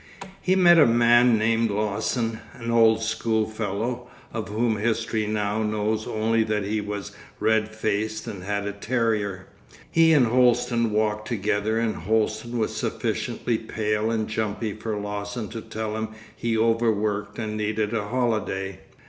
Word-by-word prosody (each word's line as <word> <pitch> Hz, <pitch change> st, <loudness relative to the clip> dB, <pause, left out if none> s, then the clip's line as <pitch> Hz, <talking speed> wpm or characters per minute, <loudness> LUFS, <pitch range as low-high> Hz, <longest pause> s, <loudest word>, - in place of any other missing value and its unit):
He 185 Hz, -, +2 dB
met 175 Hz, -2 st, +7 dB
a 150 Hz, -, +7 dB
man 120 Hz, 0 st, +5 dB
named 115 Hz, +1 st, +2 dB
Lawson, 110 Hz, +2 st, -1 dB, 0.2 s
an 115 Hz, 0 st, -4 dB
old 115 Hz, -1 st, +4 dB
school 110 Hz, -1 st, 0 dB
fellow, 110 Hz, +3 st, -3 dB, 0.3 s
of 110 Hz, -4 st, -4 dB
whom 110 Hz, +1 st, 0 dB
history 110 Hz, 0 st, 0 dB
now 105 Hz, 0 st, -1 dB
knows 110 Hz, 0 st, -1 dB
only 110 Hz, +1 st, +1 dB
that 105 Hz, -2 st, -1 dB
he 105 Hz, +1 st, -1 dB
was 105 Hz, -1 st, -5 dB, 0.3 s
red 110 Hz, -1 st, +2 dB
faced 110 Hz, 0 st, -1 dB
and 100 Hz, -6 st, -7 dB
had 100 Hz, +1 st, -2 dB
a 100 Hz, -, -2 dB
terrier. 105 Hz, -3 st, -1 dB, 0.5 s
He 165 Hz, 0 st, +5 dB
and 140 Hz, -5 st, +5 dB
Holsten 120 Hz, -1 st, +3 dB
walked 105 Hz, 0 st, 0 dB
together 105 Hz, 0 st, 0 dB
and 115 Hz, -1 st, 0 dB
Holsten 110 Hz, +2 st, -1 dB
was 110 Hz, -, -1 dB
sufficiently 115 Hz, -2 st, -2 dB
pale 110 Hz, -1 st, -1 dB
and 110 Hz, -1 st, -1 dB
jumpy 110 Hz, 0 st, -2 dB
for 110 Hz, 0 st, -4 dB
Lawson 105 Hz, +1 st, -4 dB
to 115 Hz, -, -6 dB
tell 110 Hz, 0 st, -4 dB
him 110 Hz, 0 st, -2 dB, 0.3 s
he 115 Hz, -1 st, -1 dB
overworked 110 Hz, -2 st, +1 dB
and 110 Hz, -2 st, -3 dB
needed 110 Hz, 0 st, -1 dB
a 105 Hz, -3 st, -1 dB
holiday. 110 Hz, -6 st, -1 dB
110 Hz, 150 wpm, -25 LUFS, 105-115 Hz, 0.5 s, met